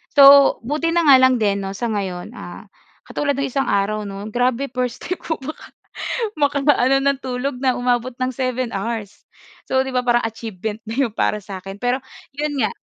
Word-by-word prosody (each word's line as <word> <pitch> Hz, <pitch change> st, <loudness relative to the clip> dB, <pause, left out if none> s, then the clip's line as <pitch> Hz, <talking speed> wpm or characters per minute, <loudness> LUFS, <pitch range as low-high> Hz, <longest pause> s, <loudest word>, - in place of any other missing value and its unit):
So, 280 Hz, -1 st, +8 dB
buti 300 Hz, +5 st, 0 dB
na 340 Hz, -, +3 dB
nga 280 Hz, -2 st, +9 dB
lang 260 Hz, -1 st, +5 dB
din 200 Hz, -2 st, +1 dB
'no 195 Hz, 0 st, -5 dB
sa 235 Hz, +3 st, -2 dB
ngayon, 190 Hz, -4 st, -4 dB
ah, -, -, -9 dB, 0.4 s
katulad 285 Hz, -2 st, -1 dB
no'ng 275 Hz, -, 0 dB
isang 270 Hz, +1 st, 0 dB
araw 205 Hz, +1 st, 0 dB
'no, 195 Hz, 0 st, -7 dB
grabe 250 Hz, +2 st, 0 dB
first 250 Hz, -2 st, -3 dB
time 365 Hz, -, -3 dB
ko 320 Hz, -, -3 dB, 1.0 s
maka 285 Hz, 0 st, +2 dB
makaano 270 Hz, -2 st, +4 dB
ng 280 Hz, -1 st, +1 dB
tulog 255 Hz, 0 st, -3 dB
na 255 Hz, -1 st, +2 dB
umabot 245 Hz, 0 st, 0 dB
ng 255 Hz, 0 st, -1 dB
7 255 Hz, -1 st, -2 dB
hours. 205 Hz, 0 st, -4 dB, 0.5 s
So, 260 Hz, 0 st, +3 dB
'di 265 Hz, -, -4 dB
ba 250 Hz, -, +3 dB
parang 240 Hz, -1 st, +2 dB
achievement 220 Hz, -1 st, -6 dB
na 225 Hz, -, -4 dB
'yon 230 Hz, -, -4 dB
para 210 Hz, -, +1 dB
sa 195 Hz, -3 st, -7 dB
akin. 195 Hz, +1 st, -8 dB
Pero 245 Hz, +4 st, 0 dB, 0.3 s
'yon 290 Hz, -1 st, -2 dB
nga 215 Hz, -5 st, +1 dB
250 Hz, 190 wpm, -20 LUFS, 215-275 Hz, 1.0 s, nga